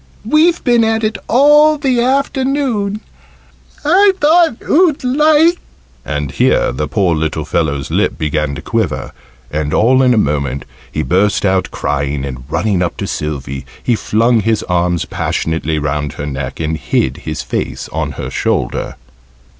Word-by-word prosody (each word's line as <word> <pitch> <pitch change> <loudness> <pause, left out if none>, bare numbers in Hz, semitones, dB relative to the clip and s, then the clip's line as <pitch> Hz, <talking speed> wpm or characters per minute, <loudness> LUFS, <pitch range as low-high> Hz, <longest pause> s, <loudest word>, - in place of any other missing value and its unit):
"We've 320 +8 +3
been 240 -2 +3
at 225 0 0
it 215 0 -1
all 295 +4 +5
the 260 -4 +1
afternoon 260 -5 0 0.8
I 385 +6 +5
thought 320 -4 +4
oo'd 315 -3 +3
like 305 +6 +3 0.3
" 60 - -33
and 75 -3 -3
here - - +2
the 65 +4 -3
poor 90 +2 +1
little 80 -1 -2
fellow's 70 -4 -1
lip - - 0
began 75 -2 -1
to 70 - -8
quiver, - - -2 0.4
and 75 0 -1
all 130 +4 +4
in 125 -2 +4
a - - +1
moment 70 -6 -1 0.3
he 75 - -2
burst 100 +5 +1
out 95 -1 +1
crying, 70 -1 -2
and 65 -2 -7
running 100 +3 0
up 85 - -2
to - - -3
Sylvie 70 -3 -4 0.2
he 120 - +2
flung 115 +2 +2
his 110 0 0
arms 85 -1 0
passionately 80 -1 -2
round 75 -1 -2
her 70 - -6
neck, 70 -2 -5
and 80 0 -2
hid 65 -3 -1
his - - -5
face - - -4
on - - -3
her - - -6
shoulder. - - -2
95 Hz, 155 wpm, -15 LUFS, -, 0.8 s, all